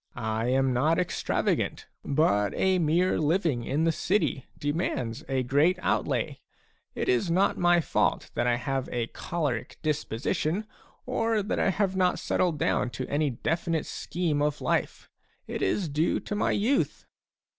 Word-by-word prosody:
I 110 +1 -2
am 130 0 +2
not 155 +7 +2
extravagant, 180 -2 -1 0.2
but 105 - +2
mere 180 -1 +2
living 155 -5 +1
in 145 +6 0
the 165 - +3
city 175 -6 0
demands 145 -6 -2
a 130 -1 +1
great 145 +8 +3
outlay. - - -1 0.6
It - - -2
is 370 - +2
not 185 +4 +3
my 175 -1 +4
fault - - 0
that 120 - 0
I 120 - +3
have 135 +1 -2
a 120 -2 -1
choleric 145 -2 -3
disposition, 155 - -1 0.4
or 225 -4 0
that 205 - -2
I - - +3
have 190 0 0
not 180 -1 +2
settled 175 -4 0
down 125 - +1
to 130 - -3
any 145 +1 +1
definite 160 +5 -1
scheme 165 -4 -2
of 150 0 0
life; - - -1 0.4
it - - -5
is 170 - +1
due 155 +3 +1
to - - -5
my 205 - +1
youth." 245 +7 0
155 Hz, 150 wpm, -27 LUFS, 135-180 Hz, 0.6 s, my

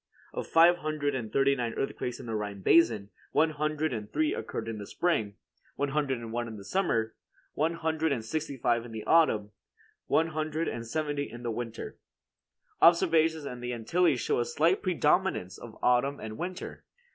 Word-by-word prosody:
Of - - -4
five 170 +2 +6
hundred 155 -3 -2
and 115 -5 -4
thirty 140 +2 +3
nine 120 -3 -3
earthquakes 125 -2 -3
in - - -8
the 115 - -4
Rhine 105 -2 -4
basin, 110 - +4 0.2
one 160 0 +3
hundred 155 0 -1
and 105 -3 -5
three 315 +2 +1
occurred 115 - -5
in 115 -2 -4
the 100 - -7
spring, 110 - 0 0.4
one 145 0 -1
hundred 140 -2 0
and 115 -1 -7
one 120 0 -2
in 110 -2 -7
the 100 - -10
summer, 115 - 0 0.4
one 160 +3 0
hundred 160 -1 0
and 115 -5 -2
sixty 150 +2 -3
five 120 -1 +1
in 120 -1 -10
the 110 - -5
autumn, 110 -11 +3 0.6
one 165 +1 +2
hundred 155 +1 -2
and 115 0 -4
seventy 145 +1 -2
in 120 +2 -9
winter. 115 0 -6 0.8
Observations 165 -2 +4
in 125 -3 -6
the 125 0 -4
Antilles 135 +5 +2
show - - 0
a 120 - +1
slight 165 +9 +2
predominance 180 - +1
of 115 -2 -11
autumn 125 +3 +2
and 110 -1 -6
winter. 180 +5 -6
140 Hz, 180 wpm, -29 LUFS, 115-160 Hz, 0.8 s, five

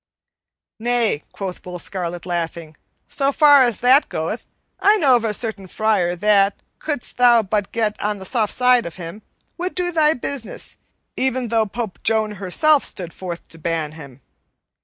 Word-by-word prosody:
"Nay," 235 -8 0
quoth 190 -3 -6
Will 180 0 -7
Scarlet, 175 -1 -5
laughing, 170 -2 -4 0.3
"so 275 -1 +1
far 290 -2 +6
as 240 -5 -2
that 260 +4 +5
goeth, 165 +9 -4 0.3
I 420 +2 +5
know 275 -9 +5
of 235 - +1
a 225 - 0
certain 210 -3 -3
friar 190 -4 +1
that, 200 +1 +3 0.2
couldst 295 -5 -4
thou 240 -2 +5
but 205 0 -2
get 220 -2 -1
on 210 0 -1
the 190 - -9
soft 220 -1 +1
side 250 -4 +3
of 170 - -8
him, 175 +3 -8 0.4
would 365 +1 -3
do 355 -1 0
thy 315 -2 +3
business 255 -1 -6 0.4
even 260 -2 -1
though 225 -1 +2
Pope 220 -2 -5
Joan 220 -1 +1
herself 285 +11 +3
stood 175 -3 -4
forth 175 -2 -7
to 165 - -13
ban 160 -2 -2
him. 140 -4 -12
215 Hz, 165 wpm, -21 LUFS, 180-250 Hz, 0.4 s, far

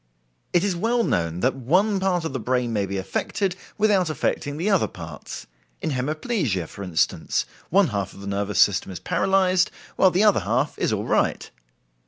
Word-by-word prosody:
It 175 0 +3
is 200 -3 0
well 230 +6 +1
known 85 - -1
that 130 - +2
one 185 - +2
part 180 -3 0
of 160 - -3
the 130 - -2
brain 125 0 0
may 100 -2 0
be 100 +1 -3
affected 180 - -2 0.2
without 205 -5 +3
affecting 145 -1 -2
the 170 +6 -2
other 195 -4 +3
parts. 85 -4 -9 0.3
In - - -2
hemiplegia, 140 - -1
for - - -11
instance, 90 -4 0 0.2
one 190 -2 +4
half 100 -3 -2
of 100 - -11
the - - -8
nervous 100 0 -2
system 100 -1 +3
is 90 - -6
paralyzed, 185 -1 +2 0.3
while 190 - +6
the 185 +3 +2
other 210 -2 +5
half 125 +8 0
is - - +1
all - - -1
right. - - 0
145 Hz, 185 wpm, -24 LUFS, -, 0.3 s, while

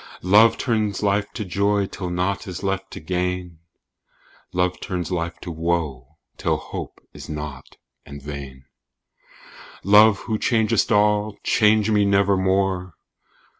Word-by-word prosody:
Love 105 +5 +5
turns 110 -4 -1
life 100 0 +1
to 110 - -5
joy 100 +2 +1
till 90 -1 -6
nought 90 +4 -2
is 95 +1 -6
left 95 0 -2
to - - -8
gain: 90 0 -3 0.9
"Love 90 0 0
turns 90 0 -4
life 85 -1 -3
to 85 - -7
woe 80 -5 -3 0.2
till - - +1
hope - - -8
is - - -11
nought 75 -3 -7 0.3
and 70 0 -10
vain." 70 -2 -8 1.2
Love, 105 +1 +6
who 110 -2 -3
changest 110 -3 +1
all, 105 0 +2
change 110 0 +3
me 105 -1 +3
nevermore! 95 -2 +1
95 Hz, 130 wpm, -22 LUFS, 85-105 Hz, 1.2 s, Love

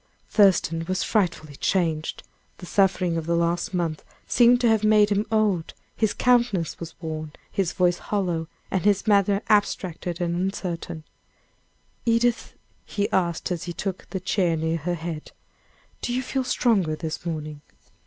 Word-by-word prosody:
Thurston 175 -5 +4
was 185 0 0
frightfully 170 -8 0
changed, 160 -2 -1 0.3
the 180 - -9
sufferings 180 -3 +2
of 165 -1 -4
the 170 - +2
last 170 +1 0
month 170 -4 -2 0.2
seemed 245 0 +5
to 240 - +4
have 220 -2 +3
made 215 -1 +5
him 205 +2 +1
old 210 -7 +1 0.2
his 220 -2 +1
countenance 240 -9 +2
was 170 -1 -8
worn, 155 -2 -5 0.2
his 185 -3 0
voice 175 -1 +2
hollow, 175 -6 -1 0.2
and 190 - 0
his 200 -1 +2
manner 200 -1 +3
abstracted 185 -4 0
and 170 -1 -1
uncertain. 175 -3 -3 1.0
"Edith," 235 0 +1 0.3
he 205 -1 -2
asked, 175 -1 0
as 175 -1 -3
he 175 - -4
took 190 +1 -5
the 190 - -3
chair 180 -2 +1
near 160 +1 0
her 175 +3 -2
head, 160 -2 -6 0.7
"do - - -2
you 255 - -1
feel 265 +1 -1
stronger 200 -10 +2
this 160 0 -5
morning?" 155 -3 -5
180 Hz, 155 wpm, -25 LUFS, 165-205 Hz, 1.0 s, seemed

